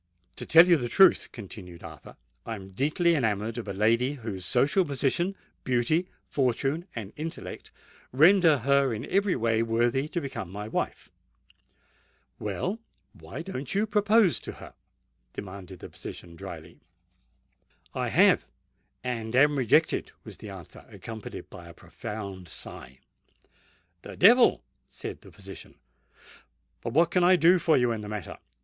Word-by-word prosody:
"To - - -4
tell 165 +2 +8
you 175 -2 +6
the 120 -4 -3
truth," 190 +5 +5
continued 95 -6 -10
Arthur, - - -12 0.3
"I 115 - -5
am 95 -2 -11
deeply 155 - +1
enamoured 110 -4 -1
of 115 - -7
a - - -3
lady 115 +7 +2
whose 110 -9 -6
social 145 +10 +3
position, 150 +6 -1 0.3
beauty, 130 +8 +1 0.2
fortune, 135 - -1
and 110 -3 -6
intellect 160 +2 -6 0.4
render 165 +3 +5
her 135 -1 +2
in 110 - -6
every 200 -1 +1
way 115 -2 +1
worthy 120 +4 +1
to 175 - -3
become 135 - -6
my 105 +3 -6
wife." - - -4 1.3
"Well—why 130 - -6
don't 145 -4 -5
you 205 +2 +2
propose 210 -2 +3
to - - -8
her?" - - -12 0.6
demanded 95 -1 -9
the - - -8
physician 85 -1 -10
drily. - - -10 1.1
"I - - -2
have—and 120 -2 -1
am 145 +3 +5
rejected," 130 -5 +2
was - - -10
the - - -9
answer, - - -11
accompanied 110 -2 -9
by 85 -1 -11
a 85 - -13
profound 100 -6 -8
sigh. 65 -4 -8 1.0
"The - - -10
devil!" 235 +6 +6 0.3
said - - -8
the - - -15
physician. - - -11 1.1
"But 115 - -5
what 165 +3 +3
can 180 0 +2
I 185 +1 +6
do 175 +1 +5
for 165 -2 +3
you 125 -2 +2
in 110 -2 -3
the 105 - -7
matter? 105 -5 -6
125 Hz, 140 wpm, -27 LUFS, 105-165 Hz, 1.3 s, tell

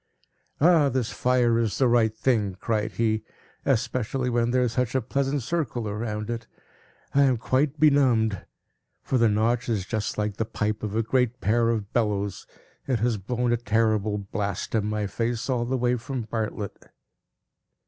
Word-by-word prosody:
"Ah, 160 -2 +5
this 125 -3 -1
fire 125 -2 +2
is 115 -3 0
the 130 - +3
right 120 -2 +3
thing!" 105 -7 +1
cried 110 +1 -2
he; 110 +1 +1 0.4
"especially 125 0 0
when 120 0 +1
there 125 +1 +2
is 120 - 0
such 125 0 -1
a - - +4
pleasant 135 +3 -1
circle 135 -5 -2
round 105 -1 -3
it. 115 -1 -5 0.7
I 140 - +4
am 130 -3 +4
quite 135 +6 0
benumbed; 125 - +3 0.6
for 130 - 0
the 115 -1 +4
Notch 115 +4 +1
is 105 -5 0
just 110 0 -3
like 105 -1 -2
the - - +1
pipe 105 0 -2
of 105 -1 -4
a 115 - +2
great 125 +1 0
pair 115 +4 +2
of 110 -3 -2
bellows; 100 -4 -1 0.4
it 130 -3 +1
has 115 0 0
blown 120 +4 -1
a - - +2
terrible 110 -2 +1
blast 100 -1 -4
in 105 -2 +1
my 105 -1 -1
face, 115 +3 -2
all 120 -2 0
the 130 +2 -1
way 125 0 +1
from 130 0 -4
Bartlett." 110 -2 -4
115 Hz, 170 wpm, -25 LUFS, 105-125 Hz, 0.7 s, Ah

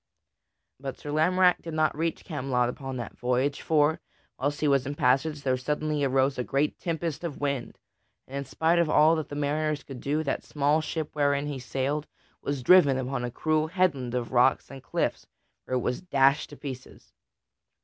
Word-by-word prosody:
But 135 0 -6
Sir 145 - -7
Lamorack 180 +4 +3
did 165 -2 -6
not 155 -2 +2
reach 165 +2 -2
Camelot 130 -6 0
upon 135 +1 -6
that 120 - -7
voyage; 125 +3 0
for, 155 0 +2 0.4
whilst 145 +2 -1
he 150 - +2
was 140 -2 +2
in 145 - -3
passage, 140 +3 +1
there 130 -1 +2
suddenly 150 +3 -1
arose 135 0 +2
a - - 0
great 140 +4 0
tempest 165 -2 -3
of 165 -5 -5
wind, 140 -4 -2 0.5
and 135 - -9
in 140 - -3
spite 160 +5 +1
of 170 -2 +2
all 155 +2 +5
that 155 - -4
the 145 - -6
mariners 150 0 -1
could 135 -3 -9
do, 150 +3 0
that 140 - -2
small 150 +2 +1
ship 155 -1 -4
wherein 140 -1 +1
he 145 -2 -4
sailed 135 +4 -2 0.3
was 140 -3 -3
driven 145 -5 +6
upon 130 -1 -2
a 120 - -2
cruel 155 +5 0
headland 155 -9 0
of 120 -2 -2
rocks 130 +2 +3
and 135 -1 -9
cliffs - - -2 0.4
where 130 - -2
it - - -1
was 125 +1 -2
dashed 140 -4 +2
to 145 - -11
pieces. 130 -3 -9
145 Hz, 190 wpm, -27 LUFS, 130-155 Hz, 0.5 s, driven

